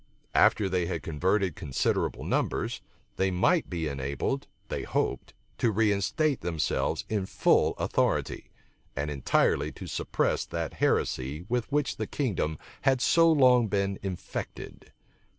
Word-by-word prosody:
After 100 - +4
they 90 -2 0
had 85 -5 -3
converted 90 +3 0
considerable 70 -8 -1
numbers, - - -1 0.4
they 95 0 +2
might 120 - +2
be 85 -3 -2
enabled, 70 - -2 0.2
they - - -3
hoped, - - -2 0.2
to 120 - +3
reinstate 110 - +1
themselves 80 -3 -1
in 100 -3 -1
full - - +3
authority, - - 0 0.5
and 75 +2 -2
entirely 70 -3 +1
to - - -9
suppress - - -1
that - - -4
heresy 70 +6 0
with 125 +2 -1
which 145 -1 0
the 110 - -3
kingdom 95 - -1 0.2
had 135 -1 +3
so 165 +5 +5
long 125 -6 +5
been 100 -1 -1
infected. 95 -3 -6
95 Hz, 130 wpm, -28 LUFS, 80-125 Hz, 0.5 s, so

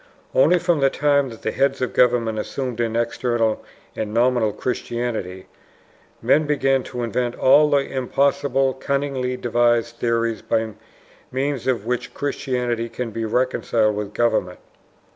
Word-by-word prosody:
Only - - +5
from 175 -2 +1
the 135 0 +4
time 140 -1 +2
that 115 -2 -12
the - - -1
heads 135 0 +1
of 130 - -2
government 115 -3 +2
assumed 125 +1 -4
an 115 -1 -1
external 115 -1 0 0.3
and 105 - -3
nominal 120 -1 +2
Christianity, 115 -6 -4 0.8
men 155 0 +3
began 135 -2 +2
to 125 -2 -5
invent 120 +1 -1
all 150 +3 +5
the 140 -1 +2
impossible, 135 0 +1
cunningly 135 -2 -2
devised 120 -1 +1
theories 115 -2 0
by 110 -1 -1 0.6
means 135 -1 -2
of 120 -5 0
which 125 +1 -3
Christianity 125 -4 -2
can 120 -1 -5
be 115 +1 -3
reconciled 115 -2 +1
with 105 0 -5
government. 110 -6 +1
125 Hz, 140 wpm, -22 LUFS, 115-135 Hz, 0.8 s, Only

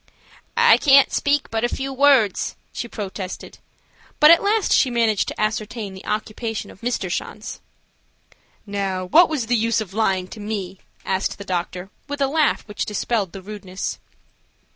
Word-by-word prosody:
"I - - +7
can't 275 -2 +5
speak 285 0 +1
but 225 0 -1
a 240 - +2
few 270 +2 -4
words," 265 -7 +3 0.2
she 235 - -4
protested, 195 -4 -7 0.6
but 300 +1 +8
at 335 - +7
last 420 0 +2
she 265 - +4
managed 230 -4 +1
to - - -6
ascertain 215 -1 -2
the 190 - -11
occupation 215 +1 -3
of - - -18
Mr. 245 +1 -2
Schanz. - - -5 1.1
"Now, 195 -2 -2
what 330 - +6
was 295 -7 -1
the 245 +2 +1
use 230 0 +1
of 200 -4 -6
lying 190 -4 0
to - - -10
me?" 200 -3 -5 0.3
asked 190 +1 -1
the 200 - -9
doctor, 180 +1 -4 0.2
with 285 0 -5
a 275 - +3
laugh 300 -1 +1
which 210 - -3
dispelled 210 -2 -1
the 195 -1 -9
rudeness. 195 -2 -6
215 Hz, 165 wpm, -22 LUFS, 195-260 Hz, 1.1 s, but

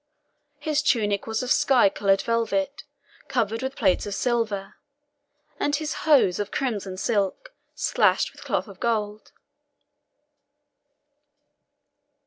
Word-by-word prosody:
His 305 -2 0
tunic 210 -9 +1
was 220 +2 -1
of 250 - -3
sky 255 -6 +5
coloured 195 0 +1
velvet, 235 +5 -1 0.4
covered 225 -4 -1
with 265 +1 -4
plates 195 -2 +1
of 200 - -3
silver, 220 -5 -1 0.8
and 290 - +1
his 310 0 -3 0.2
hose 230 - +5
of 205 0 -2
crimson 205 -8 -3
silk, 210 - -1 0.2
slashed - - +2
with - - -13
cloth - - -1
of 195 -2 -13
gold. 215 -2 -2
225 Hz, 115 wpm, -25 LUFS, 200-265 Hz, 0.8 s, sky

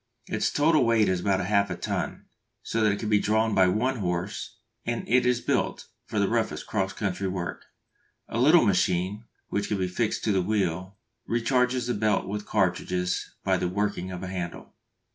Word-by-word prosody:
Its - - 0
total 155 0 +4
weight 115 -2 +3
is 95 -1 +1
about 95 0 +1
half 100 +1 +2
a - - -2
ton, - - -3 0.4
so 115 - -1
that 105 -1 +4
it 100 - -1
can 110 - -3
be 105 -1 +4
drawn 110 +1 +1
by 95 -2 +5
one 120 +8 +1
horse, 95 +5 -3 0.3
and 120 0 -3
it 125 +1 +3
is 125 -1 +2
built - - -1 0.2
for 110 - -4
the 100 -1 +3
roughest 115 0 -1
cross 95 -3 -1
country 100 -2 -2
work. 90 -2 -4 0.6
A 115 - -3
little 155 +7 +6
machine, 95 +2 +1 0.2
which 100 0 -1
can 105 - -1
be 95 -1 0
fixed 105 +5 -1
to 110 - +2
the 95 -2 +2
wheel, 95 -1 -1 0.3
recharges 125 +1 +1
the 120 - 0
belts 105 -1 +1
with 105 +1 -5
cartridges 90 -2 0
by - - +2
the 90 - -1
working 100 -1 -1
of 90 0 -6
a - - -4
handle. 90 -2 -6
105 Hz, 190 wpm, -27 LUFS, 95-115 Hz, 0.6 s, little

